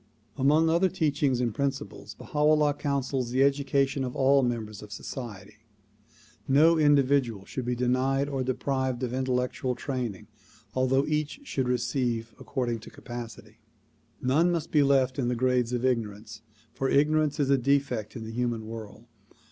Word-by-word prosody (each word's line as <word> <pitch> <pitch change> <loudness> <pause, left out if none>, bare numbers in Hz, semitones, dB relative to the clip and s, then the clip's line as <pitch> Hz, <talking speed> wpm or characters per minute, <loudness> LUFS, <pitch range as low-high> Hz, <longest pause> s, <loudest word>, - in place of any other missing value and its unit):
Among 150 +4 +3
other 170 +3 +3
teachings 145 -7 0
and 120 -3 0
principles 140 +3 -4
Baha 150 - -6
'Ullah 150 -1 +4
counsels 135 -3 -2
the 130 +2 +2
education 140 -1 +1
of 125 -1 -4
all 135 +1 +4
members 115 -4 -3
of 105 - -11
society. 105 -4 -8 0.9
No 155 +5 +5
individual 140 -8 +3
should 130 +3 -5
be 125 0 -1
denied 130 +3 +1
or 135 -2 -2
deprived 130 0 -1
of 125 -1 -2
intellectual 125 0 -1
training 125 -6 -4 0.5
although 130 +2 +2
each 155 - -2
should 130 - -2
receive 120 -2 -1
according 120 -4 -2
to 110 - -12
capacity. 120 -1 -9 0.6
None 155 +8 +2
must 170 -3 -2
be 150 - +4
left 135 -2 +2
in 125 - 0
the 125 - 0
grades 125 -1 +1
of 125 0 -1
ignorance, 110 -3 -2 0.3
for 135 - -1
ignorance 150 +1 +2
is 140 -1 +2
a 140 - +5
defect 135 -4 0
in 115 - -6
the 110 - -7
human 120 -2 -2
world. 110 0 -9
130 Hz, 155 wpm, -27 LUFS, 120-140 Hz, 0.9 s, No